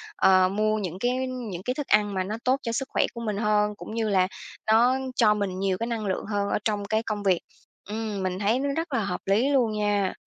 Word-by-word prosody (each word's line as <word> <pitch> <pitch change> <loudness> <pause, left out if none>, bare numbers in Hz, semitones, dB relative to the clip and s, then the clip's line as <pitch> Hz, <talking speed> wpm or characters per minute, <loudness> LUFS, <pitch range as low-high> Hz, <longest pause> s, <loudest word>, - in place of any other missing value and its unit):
ờ, 185 -1 +5
mua 215 +2 +1
những 185 -3 -4
cái 250 +2 0
những 230 -8 -5
cái 250 +4 -1
thức 290 0 -5
ăn 210 -1 +3
mà 185 -1 0
nó 210 +3 -4
tốt 260 +2 +2
cho 230 - -2
sức 270 +3 -2
khỏe - - +2
của 235 - -7
mình 210 -3 -2
hơn, 210 -1 +1
cũng 210 - -9
như 225 -2 0
là 185 -2 +3 0.4
nó 240 +3 +5 0.2
cho 215 -4 +5
mình 195 -3 -2
nhiều 195 -1 0
cái 230 +3 -3
năng 230 -3 -3
lượng 190 -2 -2
hơn 205 -1 -1
ở - - +1
trong 205 -2 0
cái 220 +2 0
công 210 -2 -3
việc. 185 -3 +3 0.5
Ừm, 215 -2 -3
mình 185 0 -2
thấy 215 +5 +2
nó 280 - -1
rất 325 -1 -3
là 245 - +2
hợp - - -3
lý 215 +8 +2
luôn 250 -6 +3
nha! 205 -2 0
210 Hz, 250 wpm, -26 LUFS, 200-235 Hz, 0.5 s, ờ